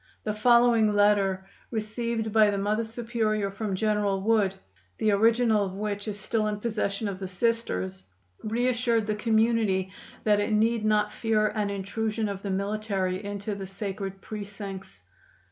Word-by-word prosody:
The 210 Hz, -, -1 dB
following 230 Hz, -1 st, +4 dB
letter, 200 Hz, -2 st, +3 dB, 0.2 s
received 220 Hz, 0 st, -2 dB
by 215 Hz, -1 st, +6 dB
the 200 Hz, -, -1 dB
Mother 210 Hz, +3 st, 0 dB
Superior 220 Hz, -3 st, -1 dB
from 200 Hz, -1 st, -3 dB
General 210 Hz, -1 st, +1 dB
Wood, 205 Hz, -2 st, +2 dB, 0.4 s
the 215 Hz, -, +2 dB
original 225 Hz, +1 st, +3 dB
of 190 Hz, -1 st, -4 dB
which 205 Hz, +1 st, -3 dB
is 205 Hz, -1 st, -4 dB
still 215 Hz, +1 st, 0 dB
in 210 Hz, -1 st, -2 dB
possession 215 Hz, -2 st, -2 dB
of 195 Hz, -2 st, -4 dB
the 190 Hz, -, -4 dB
Sisters, 180 Hz, -, -1 dB, 0.4 s
reassured 235 Hz, 0 st, +1 dB
the 215 Hz, -, 0 dB
community 220 Hz, -3 st, +1 dB, 0.3 s
that 210 Hz, -1 st, +3 dB
it 205 Hz, -, 0 dB
need 225 Hz, +1 st, +2 dB
not 210 Hz, -1 st, +2 dB
fear 215 Hz, -2 st, +1 dB
an 210 Hz, -2 st, -1 dB
intrusion 215 Hz, +2 st, -2 dB
of 195 Hz, -1 st, -5 dB
the 200 Hz, -, -4 dB
military 195 Hz, -1 st, -1 dB
into 205 Hz, +1 st, -4 dB
the 195 Hz, -1 st, -6 dB
sacred 195 Hz, 0 st, -5 dB
precincts. 200 Hz, -, -8 dB
210 Hz, 150 wpm, -27 LUFS, 200-220 Hz, 0.4 s, by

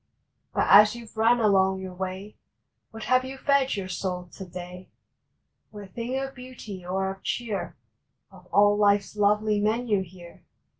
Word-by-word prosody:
But -, -, +1 dB
as 210 Hz, +3 st, +7 dB
you 235 Hz, -1 st, -9 dB
ve 220 Hz, -, -16 dB
run 230 Hz, +2 st, +3 dB
along 190 Hz, -3 st, +3 dB
your 185 Hz, -1 st, -7 dB
way 190 Hz, +3 st, -6 dB, 0.5 s
What 225 Hz, 0 st, -9 dB
have 255 Hz, +3 st, +3 dB
you 265 Hz, +1 st, -7 dB
fed 275 Hz, -2 st, +2 dB
your 195 Hz, -2 st, -4 dB
soul 180 Hz, -1 st, -4 dB
to 190 Hz, -, -8 dB
day? 180 Hz, +1 st, -9 dB, 0.8 s
What 205 Hz, -3 st, -11 dB
thing 240 Hz, +3 st, -3 dB
of 270 Hz, 0 st, -4 dB
beauty 250 Hz, -7 st, -10 dB
or 190 Hz, +2 st, -2 dB
of 195 Hz, 0 st, -11 dB
cheer 225 Hz, -5 st, -4 dB, 0.5 s
Of -, -, -17 dB
all 205 Hz, 0 st, +4 dB
life 205 Hz, -1 st, +4 dB
s -, -, -14 dB
lovely 210 Hz, +1 st, +2 dB
menu 215 Hz, -1 st, +1 dB
here? 175 Hz, -1 st, -12 dB
205 Hz, 165 wpm, -26 LUFS, 190-230 Hz, 0.8 s, as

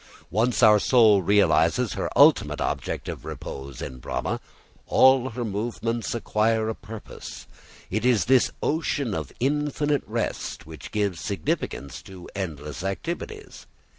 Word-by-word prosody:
Once 115 Hz, +6 st, +1 dB
our 105 Hz, -1 st, +7 dB
soul 110 Hz, -4 st, +5 dB
realises 100 Hz, +2 st, +3 dB
her -, -, -2 dB
ultimate -, -, +5 dB
object -, -, -3 dB
of -, -, -6 dB
repose 70 Hz, -1 st, -7 dB
in 65 Hz, -, -7 dB
Brahma, -, -, -3 dB, 0.5 s
all 130 Hz, -1 st, +5 dB
her 120 Hz, +1 st, -4 dB
movements 115 Hz, +2 st, -2 dB
acquire 110 Hz, -1 st, +1 dB
a -, -, -1 dB
purpose. 110 Hz, 0 st, -10 dB, 0.5 s
It 110 Hz, +4 st, -1 dB
is 120 Hz, -5 st, +3 dB
this 130 Hz, 0 st, +4 dB
ocean 145 Hz, -6 st, 0 dB
of 80 Hz, -6 st, -4 dB
infinite 145 Hz, +2 st, 0 dB
rest -, -, -3 dB
which 80 Hz, 0 st, -10 dB
gives 100 Hz, -6 st, -1 dB
significance 80 Hz, -7 st, -3 dB
to 95 Hz, -2 st, -11 dB
endless 75 Hz, -5 st, -5 dB
activities. 175 Hz, -, -5 dB
110 Hz, 130 wpm, -25 LUFS, 95-125 Hz, 0.5 s, our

